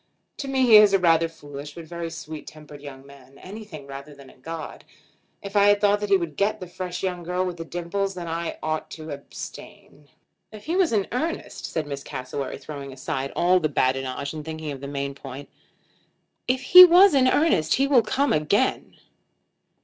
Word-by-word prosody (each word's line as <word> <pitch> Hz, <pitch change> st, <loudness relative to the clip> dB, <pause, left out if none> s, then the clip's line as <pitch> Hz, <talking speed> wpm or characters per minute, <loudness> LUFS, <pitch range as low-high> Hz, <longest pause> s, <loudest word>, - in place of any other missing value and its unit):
To 280 Hz, -, -5 dB
me 265 Hz, -1 st, +1 dB
he 225 Hz, -3 st, +8 dB
is 210 Hz, -1 st, +6 dB
a -, -, +6 dB
rather 165 Hz, -2 st, +3 dB
foolish, 145 Hz, -2 st, -10 dB
but 170 Hz, -1 st, -9 dB
very, 170 Hz, +2 st, -9 dB
very -, -, -4 dB
sweet 160 Hz, -2 st, -9 dB
tempered 150 Hz, -2 st, -12 dB
young 135 Hz, -2 st, -10 dB
man; 140 Hz, -1 st, -17 dB
anything 185 Hz, -7 st, -10 dB
rather 140 Hz, +2 st, -10 dB
than 140 Hz, -2 st, -15 dB
a -, -, -22 dB
god. 160 Hz, +4 st, -8 dB, 0.6 s
If 200 Hz, +1 st, -8 dB
I 205 Hz, 0 st, +6 dB
thought 205 Hz, 0 st, +2 dB
that 210 Hz, 0 st, -4 dB
he 195 Hz, -, +5 dB
would 170 Hz, -5 st, -6 dB
get 200 Hz, +2 st, 0 dB
the 185 Hz, -, -7 dB
fresh 180 Hz, +1 st, -6 dB
young 180 Hz, -2 st, -2 dB
girl 180 Hz, +2 st, -2 dB
with 180 Hz, -1 st, -5 dB
the 165 Hz, -, -6 dB
dimples 180 Hz, +4 st, -3 dB
then 175 Hz, -2 st, -6 dB
I 165 Hz, +1 st, -4 dB
ought 155 Hz, 0 st, -3 dB
to 155 Hz, -1 st, -8 dB
abstain." 145 Hz, +1 st, -10 dB, 0.4 s
"If 215 Hz, -1 st, -12 dB
he 330 Hz, +4 st, -2 dB
was 370 Hz, -3 st, +2 dB
in 205 Hz, -4 st, +1 dB
earnest," 315 Hz, +7 st, -4 dB
said 160 Hz, -2 st, -3 dB
Miss 140 Hz, -1 st, -6 dB
Cassewary, 130 Hz, +2 st, -5 dB
throwing 140 Hz, -2 st, -8 dB
aside 135 Hz, +1 st, -4 dB
all 180 Hz, +1 st, +3 dB
this 155 Hz, -3 st, -1 dB
badinage 135 Hz, +2 st, -1 dB
and 155 Hz, -1 st, -6 dB
thinking 160 Hz, -1 st, -6 dB
of 135 Hz, -2 st, -8 dB
the 140 Hz, -, -6 dB
main 140 Hz, 0 st, -4 dB
point, 135 Hz, 0 st, -10 dB, 1.0 s
"if 255 Hz, +1 st, +1 dB
he 365 Hz, +6 st, +11 dB
was 365 Hz, +2 st, +7 dB
in 260 Hz, -2 st, +4 dB
earnest 255 Hz, -, +2 dB
he 270 Hz, -, +2 dB
will 275 Hz, -4 st, +4 dB
come 270 Hz, +6 st, 0 dB
again." 155 Hz, +12 st, 0 dB
165 Hz, 200 wpm, -24 LUFS, 145-205 Hz, 1.0 s, he